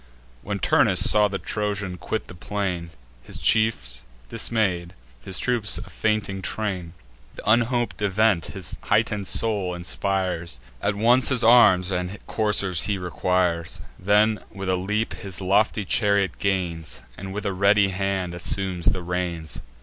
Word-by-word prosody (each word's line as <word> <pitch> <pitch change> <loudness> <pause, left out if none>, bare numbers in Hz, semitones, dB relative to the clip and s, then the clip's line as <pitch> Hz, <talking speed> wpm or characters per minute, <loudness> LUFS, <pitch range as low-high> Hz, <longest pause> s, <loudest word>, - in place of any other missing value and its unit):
When 100 +6 -4
Turnus 90 - +4
saw 105 -1 +4
the 100 -1 -3
Trojan 100 -3 -3
quit 110 - -4
the - - -10
plain, 90 -2 -3 0.3
His - - -9
chiefs 65 - +1 0.3
dismay'd, 90 -7 -1 0.3
his 95 - -2
troops 120 -5 +2
a - - -9
fainting 105 -3 -1
train, 95 -5 -3 0.4
Th' - - -7
unhop'd 120 +1 +1
event 100 -3 +2
his - - -4
heighten'd 100 -3 +1
soul 100 -5 0
inspires: 90 -3 -2 0.2
At 100 0 0
once 120 +4 +4
his 125 -3 +2
arms 100 -6 +6
and 90 +2 -3
coursers 100 -5 +2
he 100 - 0
requires; 90 -2 -1 0.2
Then, 105 +3 +3
with 95 -1 -6
a 95 - +2
leap, 105 +5 -2
his 95 -3 -5
lofty 100 +2 +1
chariot 100 -2 +1
gains, 85 -8 -2
And 95 +1 -7
with 105 +2 -5
a 100 - -1
ready 100 +1 +3
hand 95 -2 -2
assumes 90 0 -2
the 95 -3 +1
reins. 85 -3 -4
95 Hz, 140 wpm, -24 LUFS, 90-105 Hz, 0.4 s, arms